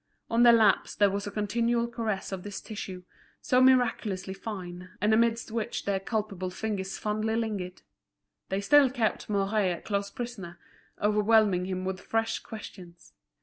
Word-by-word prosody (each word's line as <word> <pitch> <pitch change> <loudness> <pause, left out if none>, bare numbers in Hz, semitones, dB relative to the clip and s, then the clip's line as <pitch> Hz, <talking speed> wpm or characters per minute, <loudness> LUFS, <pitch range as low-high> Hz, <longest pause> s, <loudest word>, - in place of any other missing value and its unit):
On 230 +1 +3
their 240 0 +9
laps 220 -4 +3
there 205 -1 +4
was 200 +1 -3
a - - -4
continual 235 +3 0
caress 220 -5 -3
of 190 -1 -4
this 205 +1 -6
tissue, 190 -4 -7 0.4
so 250 0 +2
miraculously 225 -7 +2
fine, 185 -3 -7
and 210 +3 +3
amidst 230 0 +2
which 225 -1 -3
their 200 -1 0
culpable 200 -3 -3
fingers 190 -1 -4
fondly 215 +1 -1
lingered. 205 -6 -3 0.7
They 195 +1 -1
still 285 +5 +6
kept 235 -5 -1
Mouret 200 -1 +1
a - - -14
close 200 -1 -2
prisoner, 205 -8 -7 0.4
overwhelming 210 -3 +3
him 185 0 -3
with 190 0 -3
fresh 225 0 -1
questions. 180 -5 -11
210 Hz, 150 wpm, -28 LUFS, 190-225 Hz, 0.7 s, their